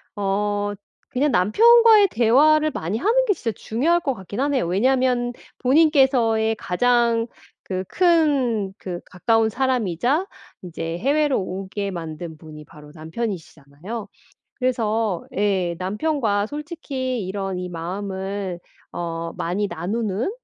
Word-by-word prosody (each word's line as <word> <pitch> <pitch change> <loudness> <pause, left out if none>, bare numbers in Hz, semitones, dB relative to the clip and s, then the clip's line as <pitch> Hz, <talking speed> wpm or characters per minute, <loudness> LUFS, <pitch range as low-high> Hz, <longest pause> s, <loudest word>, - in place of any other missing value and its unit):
어 205 0 -1 0.4
그냥 285 +2 +1
남편과의 440 - +6
대화를 300 +7 +4
많이 180 - -3
하는 460 - +2
게 420 - +3
진짜 235 -10 -3
중요할 315 +10 +1
것 280 -5 -1
같긴 195 +2 -8
하네요. 275 -4 +1
왜냐하면 245 +5 +1 0.3
본인께서의 260 -6 +3
가장 235 +3 +1 0.4
그 185 -1 -3
큰 275 - +2
그 180 -5 -6
가까운 225 +4 +1
사람이자 250 - 0 0.4
인제 165 -2 -5
해외로 290 +1 +2
오게 195 +2 -4
만든 165 -2 -6
분이 155 -1 -11
바로 150 -2 -15
남편이시잖아요. 165 +2 -6 0.5
그래서 225 -6 -1
예. 190 -4 +1
남편과 210 +2 0
솔직히 275 - -4
이런 195 -1 -3
이 180 0 -4
마음을 190 +1 -4 0.3
어 165 -1 -4
많이 190 +5 -1
나누는 200 - -2
220 Hz, 260 characters per minute, -22 LUFS, 185-265 Hz, 0.5 s, 남편과의